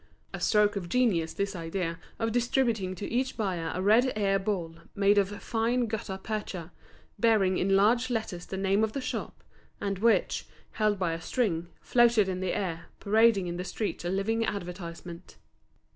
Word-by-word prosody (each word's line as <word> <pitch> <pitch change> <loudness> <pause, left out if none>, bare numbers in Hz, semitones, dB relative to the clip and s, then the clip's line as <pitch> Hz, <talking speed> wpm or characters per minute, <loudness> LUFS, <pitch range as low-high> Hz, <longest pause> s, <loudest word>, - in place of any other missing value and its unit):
A - - -4
stroke 210 -1 +3
of 180 -4 -4
genius 190 -10 +2
this 200 +4 -2
idea 170 0 -3 0.2
of 225 0 -1
distributing 235 -5 +1
to 195 - -5
each 260 +3 -1
buyer 185 -7 -1
a 185 - -3
red 235 +6 +5
air 195 -2 +2
ball 180 -5 -3 0.2
made 200 0 +4
of 195 -1 +1
fine 235 +2 +1
gutta 210 -3 -4
percha, 190 -4 -5 0.5
bearing 200 -5 +3
in 195 +1 +2
large 235 +6 +3
letters 220 -7 -3
the 190 - -5
name 195 +2 +2
of 220 -1 0
the - - -2
shop, - - -5 0.4
and 200 -2 -2
which, 230 +2 +2 0.2
held 215 -2 +1
by 180 -3 0
a 165 - -5
string, 175 -7 -1
floated 235 -4 +4
in 185 -1 -2
the 185 -1 -1
air, 170 -4 -3
parading 215 -1 +4
in 175 0 -4
the 180 - -3
streets 200 +2 -3
a 175 - -2
living 210 +5 0
advertisement. 175 -3 -6
200 Hz, 175 wpm, -29 LUFS, 180-225 Hz, 0.5 s, red